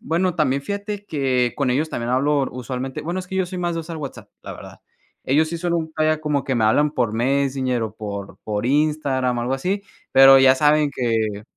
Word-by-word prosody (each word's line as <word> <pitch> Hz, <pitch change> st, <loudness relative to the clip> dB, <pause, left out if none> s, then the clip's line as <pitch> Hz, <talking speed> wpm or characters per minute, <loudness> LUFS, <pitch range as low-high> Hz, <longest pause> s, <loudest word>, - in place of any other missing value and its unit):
bueno, 175 Hz, +2 st, 0 dB
también, 140 Hz, -4 st, 0 dB
fíjate 205 Hz, +2 st, -5 dB
que 130 Hz, -4 st, 0 dB
con 135 Hz, -3 st, 0 dB
ellos 150 Hz, +5 st, 0 dB
también 120 Hz, 0 st, -3 dB
hablo 140 Hz, +2 st, +1 dB
usualmente. 125 Hz, +1 st, -5 dB
Bueno, 170 Hz, +4 st, -3 dB
es 180 Hz, -, -10 dB
que 190 Hz, -, -8 dB
yo 190 Hz, -1 st, +1 dB
soy 180 Hz, +1 st, -6 dB
más 175 Hz, -1 st, -1 dB
de 165 Hz, -, -2 dB
usar 165 Hz, 0 st, -7 dB
WhatsApp, 145 Hz, -4 st, -8 dB
la -, -, -7 dB
verdad. -, -, -12 dB, 0.4 s
Ellos 155 Hz, +4 st, +2 dB
sí 170 Hz, -, -4 dB
son 175 Hz, 0 st, -1 dB
un, 160 Hz, -1 st, -2 dB
vaya 155 Hz, 0 st, +1 dB
como 150 Hz, -3 st, -1 dB
que 135 Hz, -, -1 dB
me 115 Hz, -3 st, +1 dB
hablan 145 Hz, +7 st, +3 dB
por 120 Hz, -7 st, -1 dB
Messenger 130 Hz, 0 st, 0 dB
o 110 Hz, -, -4 dB
por 100 Hz, -2 st, -7 dB
por 105 Hz, 0 st, -3 dB
Instagram 140 Hz, -3 st, +1 dB
o -, -, -1 dB
algo 125 Hz, -, -2 dB
así, 190 Hz, +9 st, -2 dB, 0.3 s
pero 135 Hz, 0 st, +8 dB
ya 135 Hz, 0 st, +6 dB
saben 150 Hz, +1 st, +3 dB
que, 110 Hz, -5 st, -1 dB
140 Hz, 220 wpm, -21 LUFS, 125-160 Hz, 0.4 s, pero